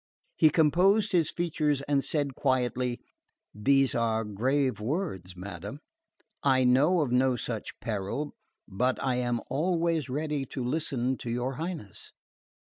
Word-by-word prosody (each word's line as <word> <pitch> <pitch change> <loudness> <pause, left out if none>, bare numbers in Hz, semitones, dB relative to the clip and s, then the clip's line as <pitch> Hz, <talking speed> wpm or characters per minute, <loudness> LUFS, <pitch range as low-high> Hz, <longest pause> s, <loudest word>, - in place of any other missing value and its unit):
He 155 - +6
composed 185 +8 +3
his 170 -5 +3
features 150 -5 0
and 140 -1 +1
said 145 -3 0
quietly: 125 -2 0 0.5
"These 135 +5 +3
are 115 -1 +1
grave 130 +6 0
words, 105 - -3
madam. 100 - -7 0.6
I 130 -2 +3
know 145 +8 +4
of 140 -5 -1
no 130 +1 +3
such 115 -2 -5
peril 110 +7 -3 0.3
but 125 +6 0
I 130 -2 +1
am 120 -2 0
always 165 0 0
ready 150 +1 -2
to 130 - -4
listen 130 -2 -1
to 120 - -6
your 125 +3 -1
Highness." 165 - -6
130 Hz, 130 wpm, -28 LUFS, 120-150 Hz, 0.6 s, He